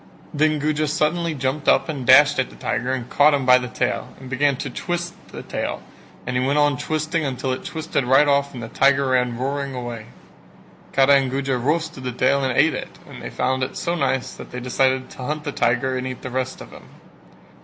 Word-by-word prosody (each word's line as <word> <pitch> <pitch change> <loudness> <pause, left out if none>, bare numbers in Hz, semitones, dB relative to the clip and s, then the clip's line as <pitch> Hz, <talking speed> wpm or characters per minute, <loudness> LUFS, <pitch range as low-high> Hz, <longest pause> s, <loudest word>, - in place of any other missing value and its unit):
Then 155 +1 +2
Guja 155 +1 0
suddenly 160 +2 0
jumped 135 +2 -2
up - - +3
and 140 -6 -5
dashed 145 +2 +7
at 130 - 0
the - - -15
tiger 125 +1 -2
and 125 -2 -3
caught 145 +3 +4
him 140 -2 -2
by 125 0 +7
the 125 - -5
tail 125 0 -2
and 130 -1 -11
began 140 +2 +2
to - - -5
twist 175 0 -3
the - - -9
tail - - -4 0.4
and 125 - -3
he 125 - +1
went 140 +3 +1
on 145 -1 +3
twisting 155 +4 -2
until 130 -1 -2
he 130 - -2
twisted 160 -3 -3
it - - -6
right 135 +3 +5
off 140 -1 +1
and 120 - -6
the - - -5
tiger 135 +2 +2
ran 125 -2 +1
roaring 140 +1 -3
away. 120 -3 -6 0.8
Kara 135 +1 +5
and 135 -1 0
Guja 135 0 -1
roasted 155 +2 -1
the 125 - -2
tail 135 +3 +1
and 130 -1 -1
ate 160 +3 +4
it, - - -7
and - - -11
they - - -6
found 130 +1 -1
it 130 - -3
so 170 -1 -1
nice 135 -5 -1
that - - -10
they 125 - -6
decided 130 +1 0
to - - -13
hunt 150 +4 -3
the 145 - -3
tiger 125 +1 +1
and 130 0 -3
eat 130 -1 -7
the 130 - -5
rest 130 +1 -3
of - - -11
him. - - -13
135 Hz, 230 wpm, -22 LUFS, 130-150 Hz, 0.8 s, dashed